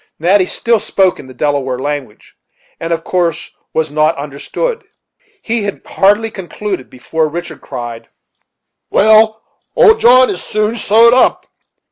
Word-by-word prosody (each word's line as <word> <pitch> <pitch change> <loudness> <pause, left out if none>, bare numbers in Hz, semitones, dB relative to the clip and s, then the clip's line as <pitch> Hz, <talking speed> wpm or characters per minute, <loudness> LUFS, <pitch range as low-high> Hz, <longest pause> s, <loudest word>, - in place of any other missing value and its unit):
Natty 185 +3 +2
still 230 +3 0
spoke 190 -2 +1
in 130 - -11
the 130 - -12
Delaware 135 -2 -1
language, 140 -5 -6 0.4
and 165 0 -4
of 165 -1 -1
course 175 -3 -2 0.2
was 160 -2 -1
not 155 +2 +1
understood. 150 - -4 0.6
He 230 0 -1
had 200 -1 -5
hardly 205 +3 +1
concluded 190 - -6
before 155 +5 -2
Richard 165 -1 -7
cried: 120 -3 -8 0.8
"Well, 220 +1 +4 0.3
old 450 -2 +5
John 255 +2 +5
is 180 - -6
soon 215 +1 -1
sewed 230 +2 +4
up. 255 - +2
185 Hz, 135 wpm, -14 LUFS, 150-220 Hz, 0.8 s, old